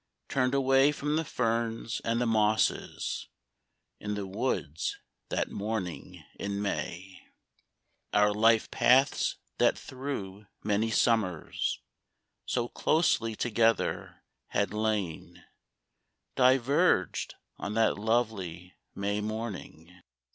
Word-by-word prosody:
Turned 130 0 +1
away 135 +1 +4
from 150 0 -2
the 160 - +1
ferns 115 -4 -1
and 115 +1 0
the 125 - +1
mosses 110 -1 +1 0.7
In 105 0 -3
the 100 -1 -3
woods 95 - -2 0.3
that - - -1
morning 100 -4 -4 0.2
in 100 0 -3
May. 95 -2 -4 0.9
Our 105 0 +4
life 110 +1 +3
paths 130 +3 +3 0.2
that - - +4
through 105 -7 -6 0.2
many 105 +2 +1
summers 110 -7 +1 0.7
So 120 -1 0
closely 120 -7 +1
together 115 0 0 0.2
had 100 0 0
lain 105 -6 -2 0.9
Diverged 130 - +3 0.2
on 100 +1 -4
that 110 -2 +2
lovely 100 -6 -1 0.2
May 100 +1 -1
morning. 100 -5 -6
110 Hz, 95 wpm, -29 LUFS, 100-120 Hz, 0.9 s, away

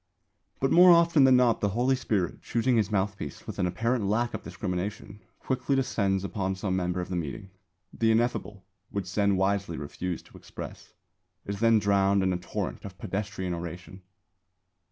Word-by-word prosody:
But 135 - +1
more 180 +1 +8
often 170 -4 +6
than 130 -1 +6
not 125 -3 +3
the 105 - +2
Holy 130 +2 +3
Spirit, 105 -9 -1
choosing 120 +2 +1
his 110 -4 +2
mouthpiece 100 -7 -2
with - - -7
an 90 - +2
apparent 115 +5 0
lack 120 +4 0
of - - -4
discrimination, 105 +2 -5 0.2
quickly 130 +1 -1
descends 100 -7 0
upon 95 -1 -2
some 95 0 -2
member 90 0 -1
of 90 - -6
the 90 - -2
meeting. 90 +5 -5 0.4
The 115 - +1
ineffable, 110 -4 -1 0.2
which 100 -2 -3
Zen 100 +1 +1
wisely 95 -3 0
refused 85 +4 -5
to - - -15
express, - - -10 0.5
is 100 0 -4
then 115 0 +5
drowned 100 -1 +3
in 95 -1 +1
a - - -1
torrent 95 +2 -5
of 95 -2 -9
pedestrian 95 -2 -3
oration. 90 +2 -7
100 Hz, 170 wpm, -28 LUFS, 95-115 Hz, 0.5 s, more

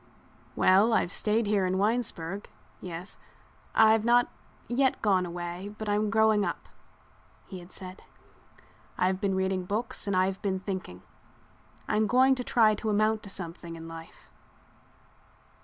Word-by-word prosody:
"Well, 200 +5 +4
I've 180 - +1
stayed 215 +2 +1
here 205 -1 +1
in 185 +1 0
Winesburg—yes—I've 205 +1 -2
not 240 +1 +3 0.4
yet 260 +2 +1
gone 190 -4 +2
away 175 +4 -6
but 215 - -6
I'm 210 +1 +1
growing 220 -1 +3
up," 175 -3 -4 0.8
he 190 - -9
had 175 +1 -14
said. 185 0 -6 1.0
"I've 185 +1 0
been 195 -1 0
reading 190 0 0
books 215 +3 -2
and 200 - 0
I've 185 +1 +1
been 190 -2 -1
thinking. 185 - -6 0.8
I'm 215 0 +1
going 260 +4 +5
to 255 -1 -3
try 225 -3 +4
to 215 +1 -3
amount 215 +1 +2
to 200 - -9
something 170 -2 -6
in 165 0 -9
life. 165 0 -12
200 Hz, 135 wpm, -28 LUFS, 185-220 Hz, 1.0 s, going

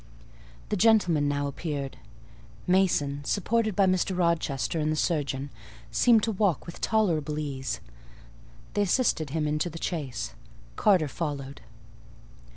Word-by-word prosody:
The - - 0
gentlemen 180 -8 +4
now 145 0 0
appeared. 140 -1 -4 0.7
Mason, 160 -7 +2
supported 215 +5 0
by 195 - +4
Mr. 185 0 +1
Rochester 165 -4 0
and 155 0 +1
the - - 0
surgeon, 140 -4 -1 0.4
seemed 230 -3 +4
to 225 - +1
walk 200 -4 +1
with 170 - -9
tolerable 165 -9 +1
ease: 135 -4 -3 0.9
they 205 - +1
assisted 190 - +1
him 155 +2 -1
into 150 +3 0
the 165 - -8
chaise; 150 -9 -3 0.4
Carter 185 -7 +3
followed. 140 -2 -5
160 Hz, 125 wpm, -27 LUFS, 145-190 Hz, 0.9 s, gentlemen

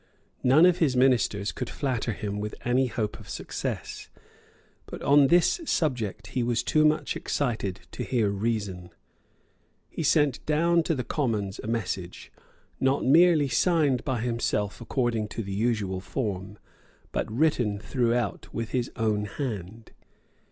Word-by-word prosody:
None 135 +7 +6
of 180 -1 +4
his 145 -6 +2
ministers 120 -5 +2
could - - -5
flatter 125 -4 -2
him 105 -1 -4
with 105 0 -4
any 125 +2 +2
hope 110 -3 -3
of - - -13
success. - - -5 0.8
But - - -8
on 140 0 +6
this 175 - +3
subject 120 - -1
he 125 - 0
was 120 0 0
too 155 +4 +3
much 155 -1 +1
excited 110 -9 -2
to - - -6
hear 115 -6 +1
reason. 100 -4 -2 1.0
He - - -4
sent 145 -3 +2
down 170 +3 +3
to 165 - +3
the 125 - -2
Commons 110 -10 -2
a - - -6
message, 95 -6 -4 0.5
not 135 +1 +1
merely 160 +1 +5
signed 140 0 +2
by 130 -5 -1
himself 115 -3 -1
according 115 -3 -1
to 115 +2 -5
the 100 0 -5
usual 105 -3 0
form, 100 -2 -4 0.5
but - - -2
written 120 -5 +1
throughout 120 0 -1
with 115 0 -4
his 125 -2 -1
own 105 -2 0
hand. 110 - -6
120 Hz, 145 wpm, -27 LUFS, 105-140 Hz, 1.0 s, None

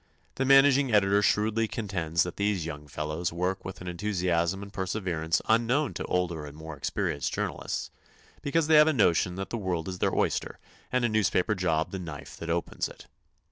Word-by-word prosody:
The 135 - -1
managing 135 0 +6
editor 100 -1 +4
shrewdly 110 +2 +2
contends 85 -7 -1
that 90 - -6
these 100 -4 0
young 75 -2 -7
fellows 75 +4 -3
work 90 +3 -2
with 95 - -8
an 90 - -7
enthusiasm 90 0 0
and 100 - -11
perseverance 85 -4 -1
unknown 120 +6 +2
to - - -4
older 85 -3 -1
and 75 +1 -11
more 80 0 -8
experienced 70 0 -2
journalists, - - -3 0.5
because 160 +3 +1
they 155 0 +5
have 150 +1 +7
a 160 - +3
notion 90 - +2
that 95 +1 -5
the 115 - -2
world 90 -4 -2
is 90 -1 -5
their - - +1
oyster - - 0 0.3
and 125 -1 +2
a - - +4
newspaper 110 -2 +2
job 85 -5 0
the 95 - -4
knife 85 -5 -8
that 85 - -6
opens 85 +1 -1
it. - - -13
95 Hz, 185 wpm, -28 LUFS, 85-110 Hz, 0.5 s, have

